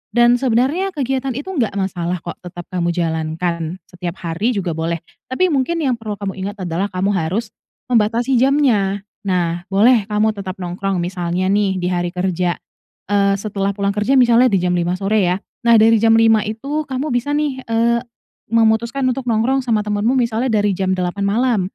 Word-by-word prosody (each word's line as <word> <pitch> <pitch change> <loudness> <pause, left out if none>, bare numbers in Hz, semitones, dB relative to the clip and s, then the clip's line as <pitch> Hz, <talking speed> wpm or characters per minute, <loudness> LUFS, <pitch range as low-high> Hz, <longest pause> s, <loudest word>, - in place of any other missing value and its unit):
dan 240 0 +5
sebenarnya 275 +10 +1
kegiatan 265 -2 -2
itu, 290 +8 -5
nggak 240 - -1
masalah 180 -3 -2
kok, 170 - -7
tetap 175 -1 -9
kamu 175 -2 -1
jalankan, 165 0 -2 0.2
setiap 180 -1 -5
hari 180 +9 -1
juga 185 -4 -1
boleh. 165 +1 -2 0.3
Tapi, 355 +8 +1
mungkin 310 +4 0
yang 255 -4 0
perlu 215 -2 -5
kamu 200 -1 -4
ingat 200 +1 -5
adalah, 180 +3 -1
kamu 190 +1 -1
harus 195 +5 -2 0.4
membatasi 235 +3 +2
jamnya. 235 -8 +2 0.2
Nah, 175 -1 -1
boleh 210 +2 +4
kamu 215 +1 +1
tetap 195 -3 -6
nongkrong 180 0 -2
misalnya 180 +1 -1
nih, 200 -1 +2
di 180 -1 -2
hari 175 -1 -1
kerja, 180 -1 0 0.6
eee, 200 -1 +3
setelah 200 -1 -2
pulang 200 0 0
kerja 210 +6 +1
misalnya, 245 -1 +5
di 200 -5 +2
jam 180 - +1
5.00 175 0 0
sore, 200 +3 +1
ya. 180 +1 +1 0.3
Nah, 235 - +7
dari 225 0 +5
jam 225 +1 +4
5.00 225 -1 +5
itu, 280 +8 -3
kamu 265 +3 -3
bisa 245 +4 0
nih, 290 -3 -1
eee, 230 +1 +2 0.5
memutuskan 230 +3 +2
untuk 255 0 -5
nongkrong 235 +4 +2
sama 225 -4 0
temanmu, 210 +4 +1
misalnya, 235 0 0
dari 210 -2 +2
jam 190 0 0
8.00 185 +2 -2
malam. 230 +1 +1
210 Hz, 175 wpm, -19 LUFS, 185-240 Hz, 0.6 s, Nah